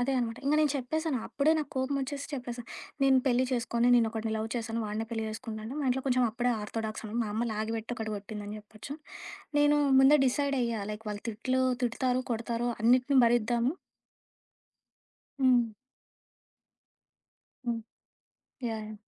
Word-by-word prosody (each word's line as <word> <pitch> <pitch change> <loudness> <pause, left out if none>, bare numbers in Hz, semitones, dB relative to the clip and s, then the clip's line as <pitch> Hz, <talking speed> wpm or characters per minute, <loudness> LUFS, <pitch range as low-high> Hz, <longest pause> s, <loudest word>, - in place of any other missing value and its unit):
అదే 270 +2 +1
అనమాట. 235 -1 -1
ఇంగ 285 +2 +3
నేను 300 - +3
చెప్పేసాను. 300 +2 -1
అప్పుడే 290 +3 +2
నాకు 300 -2 -3
కోపం 260 +2 0
ఒచ్చేసి 280 +1 -4
చెప్పేసా. 245 -2 -5 0.4
నేను 270 -1 +6
పెళ్లి 255 0 +3
చేస్కోను. 240 -1 +1
నేనొకడిని 225 -1 0
లవ్ 220 +1 -2
చేశాను. 230 -1 -2
వాడినే 215 +2 -3
పెళ్లి 225 -1 -2
చేసుకుంటా 220 0 -6
అంటే 240 +5 -5
మా 285 - -1
ఇంట్లో 260 +1 +1
కొంచెం 255 -1 +3
అప్పుడే 240 +2 0
ఆర్తోడాక్స్‌ను. 220 0 -4
మా - - -2
అమ్మ 230 +3 0
లాగి 220 +1 -2
పెట్టి 225 +2 -5
ఒకటి 220 -1 -3
కొట్టిందని 205 +1 -6
జెప్పొచ్చు. 215 +6 -9 0.6
నేను 290 0 +5 0.2
ముందే 280 +3 +7
డిసైడ్ 280 +2 +1
అయ్యా 230 -2 -1
లైక్ 210 +1 -8
వాళ్ళు 205 0 -5
తిట్లు 255 +4 0 0.2
తిటుతారు, 250 +1 +1
కొడతారు, 235 +1 -1
అన్నిటిని 255 +4 +4
భరిద్దాము 240 +2 +2 1.7
హ్మ్. 245 -3 +5 2.0
హ్మ్. 235 -1 0 0.9
యాహ్! 215 -1 -5
240 Hz, 145 wpm, -30 LUFS, 220-260 Hz, 2.0 s, ముందే